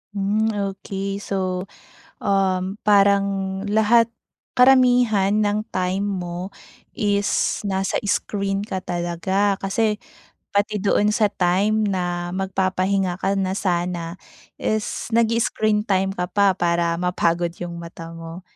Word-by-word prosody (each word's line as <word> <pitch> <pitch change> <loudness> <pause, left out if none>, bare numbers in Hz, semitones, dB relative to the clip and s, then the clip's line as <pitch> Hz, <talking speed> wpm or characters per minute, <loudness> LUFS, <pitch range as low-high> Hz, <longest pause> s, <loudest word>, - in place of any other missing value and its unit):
Hmm 205 +2 +1 0.2
okey, 195 0 -5
so 185 -2 -2 0.6
um, 195 0 0
parang 200 -1 +5 0.4
lahat 220 +2 +4 0.5
karamihan 245 -6 +5
ng 210 +1 -1
time 185 +2 -1
mo 180 -2 -4 0.5
is 205 -1 +1
nasa 190 0 0
screen 200 0 -1
ka 195 -3 -3
talaga. 185 +3 -1
Kasi 210 +2 0 0.5
pati 205 0 0
doon 205 +1 +3
sa 210 -3 +2
time 205 +4 +1
na 175 -2 -2
magpapahinga 190 -1 0
ka 195 +1 +1
na 190 -1 0
sana 175 -2 -1 0.4
is 215 -1 -2
nag-i-screen 225 -2 +2
time 190 -1 +1
ka 180 -2 -2
pa 200 -1 +3
para 170 -1 +1
mapagod 175 -1 0
yung 175 -1 -5
mata 165 -1 -9
mo, 165 +2 -9
195 Hz, 115 wpm, -22 LUFS, 180-205 Hz, 0.6 s, parang